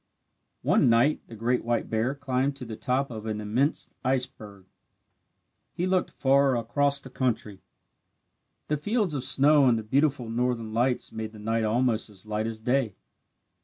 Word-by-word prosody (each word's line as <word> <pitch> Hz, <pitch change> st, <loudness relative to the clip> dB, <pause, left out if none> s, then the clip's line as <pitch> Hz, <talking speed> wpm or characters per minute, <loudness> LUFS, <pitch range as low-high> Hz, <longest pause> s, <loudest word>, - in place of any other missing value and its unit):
One -, -, +4 dB
night 120 Hz, +6 st, +3 dB
the 115 Hz, -, -10 dB
great 120 Hz, +3 st, 0 dB
white 120 Hz, 0 st, -1 dB
bear 115 Hz, +5 st, 0 dB
climbed 135 Hz, 0 st, -1 dB
to 130 Hz, -2 st, -7 dB
the 115 Hz, -1 st, -6 dB
top 130 Hz, +4 st, -1 dB
of 110 Hz, -1 st, -7 dB
an 105 Hz, -1 st, -2 dB
immense 120 Hz, +8 st, 0 dB
iceberg. 110 Hz, -7 st, -3 dB, 1.1 s
He 175 Hz, -, -2 dB
looked 185 Hz, 0 st, +1 dB
far 135 Hz, -1 st, +3 dB
across 140 Hz, +5 st, +1 dB
the 130 Hz, -, -11 dB
country. 115 Hz, -7 st, -2 dB, 1.1 s
The 150 Hz, -, 0 dB
fields 205 Hz, +2 st, 0 dB
of 135 Hz, -3 st, -2 dB
snow 140 Hz, +1 st, +4 dB
and 120 Hz, -2 st, +4 dB
the 110 Hz, -, -4 dB
beautiful 135 Hz, +1 st, +1 dB
northern 115 Hz, -1 st, -1 dB
lights 125 Hz, +2 st, 0 dB
made 110 Hz, 0 st, -5 dB
the -, -, -11 dB
night 110 Hz, +1 st, -1 dB
almost 115 Hz, 0 st, +1 dB
as 100 Hz, -1 st, -12 dB
light 110 Hz, +1 st, -2 dB
as 115 Hz, -1 st, -5 dB
day. 120 Hz, -3 st, 0 dB
125 Hz, 165 wpm, -27 LUFS, 110-140 Hz, 1.1 s, One